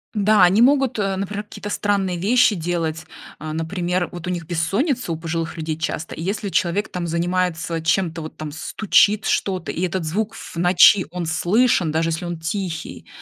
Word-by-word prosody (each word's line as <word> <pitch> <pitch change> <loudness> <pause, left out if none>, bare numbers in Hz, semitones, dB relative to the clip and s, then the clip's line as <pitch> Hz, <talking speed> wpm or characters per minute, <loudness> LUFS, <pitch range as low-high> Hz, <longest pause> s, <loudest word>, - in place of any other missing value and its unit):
Да, 210 -1 +4
они 190 +5 +5
могут, 265 -3 +3
э, 195 -1 0
например 200 +2 -4
какие-то 205 0 -8
странные 195 -4 0
вещи 225 +2 +3
делать. 165 -1 -2 0.3
А, 155 0 -6
например, 175 +2 -2
вот 175 0 -7
у - - -1
них 175 -3 -3
бессонница, 195 - -1
у 160 - -2
пожилых 165 0 -4
людей, 155 -1 -3
часто, 160 0 -4
и - - -7
если 200 +2 -2
человек 180 +4 0
там 175 -1 -3
занимается 170 -1 -1
чем-то, 165 0 0
вот 155 - -9
там 155 -1 -6
стучит 205 +5 +2
что-то, 185 -3 -1
и 170 - -5
этот 185 -1 -1
звук 210 +7 -2
в - - -10
ночи, 180 +2 +6
он 180 -1 -4
слышен, 175 +2 +2
даже 165 +1 0
если 165 +2 -3
он 175 -1 -5
тихий, 165 0 -5
180 Hz, 180 wpm, -21 LUFS, 165-200 Hz, 0.3 s, ночи